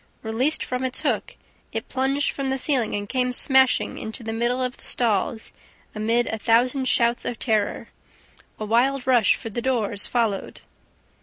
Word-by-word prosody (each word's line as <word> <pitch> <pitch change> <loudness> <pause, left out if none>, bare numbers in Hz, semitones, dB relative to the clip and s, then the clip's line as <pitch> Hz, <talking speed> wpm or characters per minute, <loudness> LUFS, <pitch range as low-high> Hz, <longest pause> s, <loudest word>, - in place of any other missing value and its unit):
Released 245 +8 +1
from 250 0 -3
its 255 -1 -3
hook, - - -1 0.4
it - - -4
plunged 275 +2 0
from 275 -1 -3
the 265 - 0
ceiling 255 -6 0
and 205 0 -3
came 250 +2 0
smashing 265 +1 +2
into 220 +2 -6
the 225 0 -4
middle 240 +2 0
of 255 -1 -2
the - - -14
stalls, 220 -1 0 0.4
amid 230 +3 +1
a 220 - -4
thousand 245 +5 +2
shouts 235 -1 +2
of 240 - -3
terror. 215 -3 -1 0.7
A 215 - -3
wild 250 +4 +1
rush 245 -5 +4
for 225 - -7
the 240 - -3
doors 225 -6 +1
followed. 225 -5 -1
240 Hz, 165 wpm, -23 LUFS, 220-260 Hz, 0.7 s, rush